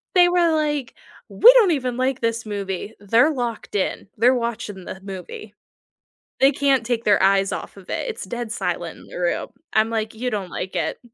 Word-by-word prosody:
They 355 Hz, -1 st, +7 dB
were 350 Hz, -2 st, +3 dB
like, 295 Hz, -4 st, -1 dB, 0.4 s
"We 480 Hz, -, +8 dB
don't 445 Hz, -8 st, +5 dB
even 255 Hz, -5 st, -1 dB
like 260 Hz, 0 st, 0 dB
this 230 Hz, 0 st, -1 dB
movie," 200 Hz, 0 st, -4 dB
they're 230 Hz, +9 st, +3 dB
locked 240 Hz, -7 st, -4 dB
in, 195 Hz, -, -1 dB
they're 245 Hz, +4 st, +4 dB
watching 225 Hz, -5 st, -4 dB
the 190 Hz, -, -7 dB
movie. 195 Hz, +2 st, -8 dB, 0.9 s
They 270 Hz, -, +6 dB
can't 275 Hz, -3 st, +2 dB
take 235 Hz, -2 st, -1 dB
their 205 Hz, -2 st, +4 dB
eyes 195 Hz, 0 st, +3 dB
off -, -, -6 dB
of 195 Hz, -2 st, -14 dB
it, -, -, -2 dB
it's 460 Hz, -, -5 dB
dead 240 Hz, -2 st, -5 dB
silent -, -, -3 dB
in -, -, -15 dB
the -, -, -9 dB
room, -, -, -1 dB, 0.2 s
I'm, 220 Hz, +1 st, +2 dB
like, 220 Hz, -1 st, -2 dB
"You 250 Hz, +3 st, -3 dB
don't 200 Hz, -5 st, -4 dB
like 185 Hz, +2 st, -5 dB
it?" -, -, -2 dB
235 Hz, 195 wpm, -22 LUFS, 205-270 Hz, 0.9 s, We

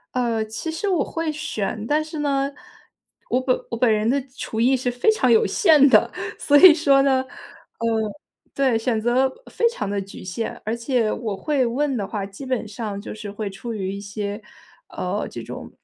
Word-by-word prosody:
呃， 230 Hz, -3 st, +1 dB
其 220 Hz, +9 st, -5 dB
实 335 Hz, +6 st, -3 dB
我 355 Hz, -7 st, +2 dB
会 330 Hz, -1 st, -3 dB
选。 220 Hz, -8 st, -3 dB
但 300 Hz, +4 st, +1 dB
是 310 Hz, -1 st, -7 dB
呢， 275 Hz, -1 st, 0 dB, 0.8 s
我 250 Hz, -, +2 dB
本 255 Hz, -1 st, +1 dB
我 230 Hz, -, -3 dB
本 230 Hz, -1 st, +3 dB
人 215 Hz, +2 st, +1 dB
的 275 Hz, +1 st, +2 dB, 0.2 s
厨 220 Hz, 0 st, -3 dB
艺 260 Hz, +3 st, +4 dB
是 250 Hz, 0 st, -1 dB
非 245 Hz, -, +2 dB
常 260 Hz, -, +1 dB
有 225 Hz, -, +5 dB
限 300 Hz, -7 st, +5 dB
的。 -, -, +5 dB, 0.3 s
所 290 Hz, 0 st, +4 dB
以 360 Hz, 0 st, +10 dB
说 280 Hz, -4 st, +4 dB
呢， 265 Hz, -1 st, +3 dB
呃 -, -, -18 dB, 1.3 s
对， 260 Hz, -5 st, +2 dB
选 225 Hz, -1 st, 0 dB
择 250 Hz, +3 st, +2 dB, 0.2 s
非 465 Hz, -, +2 dB
常 205 Hz, -, -3 dB
的 200 Hz, 0 st, -1 dB
局 195 Hz, -, -10 dB
限， 190 Hz, +5 st, -4 dB
而 220 Hz, -, -2 dB
且 235 Hz, -2 st, 0 dB
我 220 Hz, -4 st, -3 dB
会 280 Hz, +1 st, 0 dB
问 265 Hz, +2 st, 0 dB
的 200 Hz, -2 st, -3 dB
话， 200 Hz, -2 st, -3 dB
基 200 Hz, +7 st, -10 dB
本 255 Hz, -3 st, -1 dB
上 210 Hz, -1 st, -5 dB
就 -, -, -7 dB
是 210 Hz, -1 st, -7 dB
会 205 Hz, 0 st, -4 dB
出 225 Hz, +4 st, -7 dB
于 190 Hz, -2 st, -3 dB
一 200 Hz, -, -5 dB
些， 205 Hz, +1 st, -5 dB, 0.5 s
呃， -, -, -3 dB
这 -, -, -7 dB
种 -, -, -8 dB
245 Hz, 210 characters per minute, -22 LUFS, 215-280 Hz, 1.3 s, 以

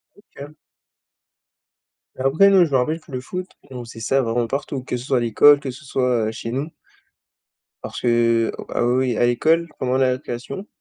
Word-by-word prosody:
OK. 150 Hz, -7 st, -13 dB, 1.6 s
Et -, -, -8 dB
après 155 Hz, +10 st, +4 dB
nous, 190 Hz, -3 st, +5 dB
je 155 Hz, -, -7 dB
me 135 Hz, -, +3 dB
rappelle 155 Hz, +6 st, -1 dB
que 155 Hz, -, -18 dB
le 130 Hz, -1 st, -4 dB
foot 180 Hz, +7 st, -6 dB, 0.2 s
et 130 Hz, -, -11 dB
on 125 Hz, -, -6 dB
faisait 115 Hz, 0 st, -11 dB
ça 135 Hz, +5 st, +1 dB
vraiment 115 Hz, -1 st, -1 dB
partout, 135 Hz, +1 st, -4 dB
que 125 Hz, -, -3 dB
ce 120 Hz, -, -8 dB
soit 130 Hz, -, +1 dB
à -, -, +2 dB
l'école, 120 Hz, +5 st, +5 dB
que 140 Hz, -2 st, -5 dB
ce 135 Hz, +4 st, -13 dB
soit, 125 Hz, -4 st, 0 dB
heu, -, -, -2 dB
chez 115 Hz, +1 st, -6 dB
nous 135 Hz, +5 st, -2 dB, 1.2 s
parce -, -, -7 dB
que 115 Hz, -1 st, +2 dB, 0.2 s
ah, -, -, 0 dB
oui, 120 Hz, -, +2 dB, 0.2 s
oui 115 Hz, -, -2 dB
à 120 Hz, -, +3 dB
l'école, 160 Hz, +8 st, +2 dB
pendant 130 Hz, 0 st, 0 dB
la 130 Hz, -1 st, +3 dB
récréation, 125 Hz, -, -6 dB
130 Hz, 205 wpm, -21 LUFS, 120-145 Hz, 1.6 s, nous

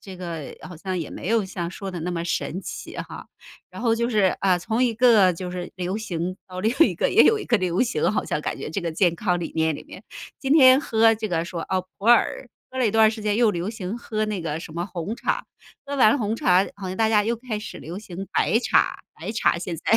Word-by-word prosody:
这 190 Hz, -2 st, -10 dB
个 170 Hz, -5 st, -6 dB
好 180 Hz, -3 st, -9 dB
像 185 Hz, +2 st, -4 dB
也 165 Hz, -, -4 dB
没 -, -, -7 dB
有 225 Hz, -1 st, +2 dB
像 175 Hz, -3 st, -4 dB
说 195 Hz, +1 st, -6 dB
的 180 Hz, -, -6 dB
那 175 Hz, +2 st, -3 dB
么 170 Hz, 0 st, -3 dB
神 175 Hz, +2 st, -2 dB
奇 -, -, -7 dB
哈。 -, -, -7 dB, 0.4 s
然 -, -, -9 dB
后 230 Hz, -1 st, +2 dB
就 235 Hz, +1 st, 0 dB
是， 205 Hz, -5 st, +3 dB
啊， 185 Hz, -2 st, +3 dB
从 220 Hz, +8 st, 0 dB
一 235 Hz, -2 st, 0 dB
个 220 Hz, -6 st, +5 dB
就 180 Hz, +1 st, -6 dB
是 180 Hz, 0 st, -5 dB
流 185 Hz, +2 st, -3 dB
行 180 Hz, -3 st, -3 dB
到 185 Hz, -1 st, -7 dB
另 220 Hz, +3 st, +1 dB, 0.2 s
一 -, -, -4 dB
个 -, -, 0 dB
也 -, -, +6 dB
有 445 Hz, -, +5 dB
一 425 Hz, -, -5 dB
个 235 Hz, -, +3 dB
流 185 Hz, +3 st, +1 dB
行， 240 Hz, -3 st, 0 dB
好 -, -, -1 dB
像 150 Hz, -, -2 dB
感 -, -, -3 dB
觉 -, -, -6 dB
这 195 Hz, -, -2 dB
个 170 Hz, -2 st, -3 dB
健 175 Hz, 0 st, +3 dB
康 180 Hz, -3 st, 0 dB
理 165 Hz, -, -4 dB
念 160 Hz, -1 st, +2 dB
里 -, -, -8 dB
面， -, -, -12 dB, 0.4 s
今 270 Hz, +1 st, 0 dB
天 260 Hz, -4 st, +8 dB
喝 225 Hz, -4 st, +4 dB
这 220 Hz, 0 st, -3 dB
个， 170 Hz, -3 st, -1 dB
说： 170 Hz, -3 st, -5 dB
“哦， 185 Hz, -1 st, 0 dB
普 200 Hz, -, -10 dB
洱。” 240 Hz, +2 st, +4 dB, 0.3 s
喝 260 Hz, -, -5 dB
了 255 Hz, -, +3 dB
一 215 Hz, -, +2 dB
段 220 Hz, -1 st, +6 dB
儿 -, -, +1 dB
时 220 Hz, -1 st, -7 dB
间 210 Hz, -1 st, 0 dB
又 230 Hz, -2 st, +4 dB
流 175 Hz, 0 st, -3 dB
行 220 Hz, 0 st, -5 dB
喝 215 Hz, -2 st, -2 dB
那 205 Hz, -4 st, -3 dB
个 160 Hz, -1 st, -3 dB
什 160 Hz, -, -9 dB
么 170 Hz, +2 st, -3 dB
红 190 Hz, +4 st, -5 dB
茶， -, -, -1 dB, 0.4 s
喝 280 Hz, 0 st, -4 dB
完 235 Hz, 0 st, +5 dB
红 220 Hz, -3 st, -1 dB
茶， 185 Hz, -3 st, +4 dB
然 -, -, -7 dB
后 190 Hz, -2 st, -5 dB
大 220 Hz, +2 st, +2 dB
家 210 Hz, -2 st, +3 dB
又 235 Hz, +2 st, 0 dB
开 230 Hz, -2 st, -5 dB
始 215 Hz, -, -8 dB
流 170 Hz, +5 st, -7 dB
行 195 Hz, -2 st, -8 dB
白 225 Hz, -, +2 dB
茶， -, -, +2 dB, 0.2 s
白 215 Hz, -, -6 dB
茶 190 Hz, -5 st, +2 dB
现 170 Hz, -2 st, -4 dB
在 -, -, -11 dB
195 Hz, 280 characters per minute, -24 LUFS, 175-225 Hz, 0.4 s, 天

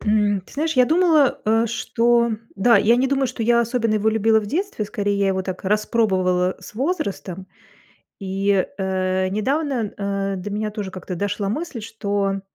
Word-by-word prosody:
М, 210 Hz, -2 st, +2 dB
ты 185 Hz, -, -19 dB
знаешь, 315 Hz, +3 st, 0 dB
я 255 Hz, -, +6 dB
думала, 315 Hz, -2 st, +3 dB
э, 225 Hz, +2 st, +2 dB
что 235 Hz, +1 st, +1 dB, 0.3 s
да, 230 Hz, +4 st, +5 dB
я 230 Hz, +3 st, +4 dB
не 255 Hz, +2 st, +2 dB
думаю, 270 Hz, 0 st, +1 dB
что 245 Hz, -1 st, -5 dB
я 235 Hz, +1 st, +4 dB
особенно 230 Hz, -1 st, 0 dB
его 215 Hz, +1 st, +1 dB
любила 220 Hz, 0 st, +3 dB
в 210 Hz, -, -7 dB
детстве, 350 Hz, -, -2 dB
скорее 205 Hz, -1 st, -2 dB
я 200 Hz, -, +2 dB
его 190 Hz, 0 st, 0 dB
так 185 Hz, 0 st, -6 dB
распробовала 185 Hz, -3 st, +1 dB
с -, -, -12 dB
возрастом. 210 Hz, -, -3 dB, 0.7 s
И, 195 Hz, 0 st, 0 dB
э, 185 Hz, -1 st, 0 dB
недавно, 250 Hz, +2 st, -1 dB
э, 195 Hz, -1 st, -2 dB
до 185 Hz, +3 st, -6 dB
меня 210 Hz, +1 st, -2 dB
тоже 205 Hz, -3 st, -5 dB
как-то 185 Hz, 0 st, -6 dB
дошла 200 Hz, +1 st, -2 dB
мысль, 275 Hz, 0 st, -4 dB
что 200 Hz, -3 st, -2 dB
210 Hz, 170 wpm, -22 LUFS, 195-240 Hz, 0.7 s, я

